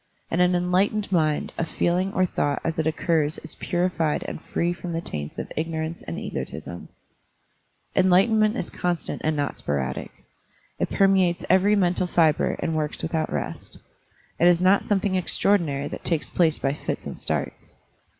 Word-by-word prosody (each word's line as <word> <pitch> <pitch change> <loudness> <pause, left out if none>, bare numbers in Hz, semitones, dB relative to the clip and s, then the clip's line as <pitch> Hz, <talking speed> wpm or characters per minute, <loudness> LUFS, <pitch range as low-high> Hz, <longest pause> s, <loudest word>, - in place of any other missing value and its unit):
In 165 - 0
an 180 0 +4
enlightened 190 +4 +1
mind 155 -4 +1
a - - +2
feeling 180 +3 0
or 185 - +3
thought 145 -5 -1
as 165 -1 -2
it 160 - +1
occurs 160 -1 +1
is 160 - -6
purified 175 -3 0
and - - -6
free 170 +1 -1
from 175 0 -6
the 165 - -1
taints 75 - -6
of - - -5
ignorance 160 +1 -3
and 85 - -6
egotism; 85 - -6 1.1
Enlightenment 215 +5 +4
is 175 - -4
constant 175 -2 -2
and 155 0 +1
not 145 -1 -2
sporadic. 65 -2 -2 0.7
It - - 0
permeates 190 -3 +3
every 195 +3 +5
mental 180 -2 +1
fibre 160 -3 +2
and 160 - -1
works 155 -1 -2
without 160 -1 -1
rest. 75 -2 -5 0.6
It 175 - +5
is 175 -1 +5
not 185 +2 +4
something 200 -1 +1
extraor 195 +2 +3
dinary 145 -4 -3
that - - -7
takes 165 -3 0
place 165 -3 +2
by 135 - 0
fits - - -4
and - - -5
starts. - - -4
170 Hz, 165 wpm, -24 LUFS, 155-185 Hz, 1.1 s, every